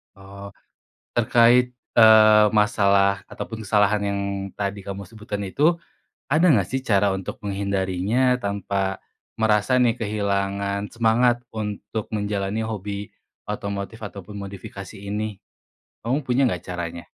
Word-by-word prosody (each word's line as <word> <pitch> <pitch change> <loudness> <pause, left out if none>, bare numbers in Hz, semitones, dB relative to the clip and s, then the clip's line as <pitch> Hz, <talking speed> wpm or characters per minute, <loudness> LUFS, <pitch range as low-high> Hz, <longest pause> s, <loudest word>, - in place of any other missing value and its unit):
Oh, 100 0 -11 0.6
terkait, 120 +2 +4 0.2
eee, 110 -1 +8
masalah 100 -2 +3
ataupun 110 -2 -7
kesalahan 105 0 +2
yang 100 0 -1 0.3
tadi 100 -1 -4
kamu 100 0 -5
sebutkan 105 -2 -6
itu, 150 - +2 0.5
ada 160 +5 +3
gak 105 - +4
sih 130 0 -2
cara 100 -4 +2
untuk 95 -1 -5
menghindarinya 100 +5 0
tanpa 100 -1 -2 0.4
merasa 110 +3 +2
nih 120 -2 +4
kehilangan 100 -1 -1
semangat 120 +1 +2
untuk 105 0 -5
menjalani 105 0 -2
hobi 100 -2 -5 0.3
otomotif 100 +1 -5
ataupun 100 0 -8
modifikasi 100 0 -9
ini? 105 +1 -4 0.6
Kamu 130 +5 -1
punya 125 +1 +2
gak 90 -5 -4
caranya? 85 -1 -5
105 Hz, 115 wpm, -23 LUFS, 100-110 Hz, 0.6 s, eee